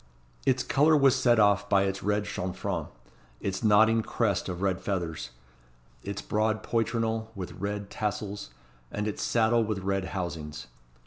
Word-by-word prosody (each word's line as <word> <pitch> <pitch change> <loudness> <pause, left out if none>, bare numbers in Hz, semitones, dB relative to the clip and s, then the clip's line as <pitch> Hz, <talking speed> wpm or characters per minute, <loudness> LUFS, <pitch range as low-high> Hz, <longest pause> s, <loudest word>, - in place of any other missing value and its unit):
Its 130 -1 +3
colour 150 +3 +4
was 135 -2 +5
set 120 -2 +4
off 100 -1 +3
by 100 -1 +4
its 95 0 -2
red 105 +1 +1
chanfrein, 95 -2 -3 0.5
its 95 +2 -3
nodding 110 +1 +5
crest 105 -4 0
of 90 +1 -4
red 95 -2 0
feathers, 85 -6 -3 0.7
its 100 +5 -5
broad 110 +1 0
poitrinal 115 -1 0
with 95 -2 -5
red 100 +2 -4
tassels, 105 - -3 0.4
and 105 +1 -2
its 105 - -3
saddle 115 0 +3
with 110 -2 -2
red 95 0 -1
housings. 85 -5 -5
105 Hz, 145 wpm, -28 LUFS, 95-110 Hz, 0.7 s, was